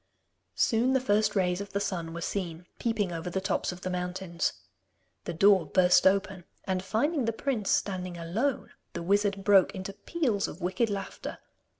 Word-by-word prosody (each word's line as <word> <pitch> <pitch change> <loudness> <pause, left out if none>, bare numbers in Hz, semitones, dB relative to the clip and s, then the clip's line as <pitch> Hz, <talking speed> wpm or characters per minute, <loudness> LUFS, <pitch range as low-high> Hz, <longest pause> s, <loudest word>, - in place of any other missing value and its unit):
Soon 240 +3 +2
the 265 - +4
first 215 -4 +2
rays 180 -1 +1
of 200 0 -8
the 200 - +1
sun 175 -5 -3
were 170 +1 -6
seen 175 -2 -4
peeping 215 -5 0
over 170 +1 -4
the 190 - -1
tops 190 0 -1
of 180 0 -10
the 185 - -3
mountains. 180 -1 -2 0.7
The - - -3
door 190 -2 +5
burst 180 0 +5
open, 190 -2 +1 0.2
and 185 -1 -1
finding 250 - 0
the 230 - +1
prince 225 -3 -2
standing 185 -3 -1
alone 215 +12 -2 0.2
the - - -4
wizard 200 +1 +1
broke 195 -2 +5
into 190 +1 -5
peals 240 -12 -1
of 170 - -9
wicked 190 +6 0
laughter. 195 -2 -5
195 Hz, 175 wpm, -29 LUFS, 180-210 Hz, 0.7 s, door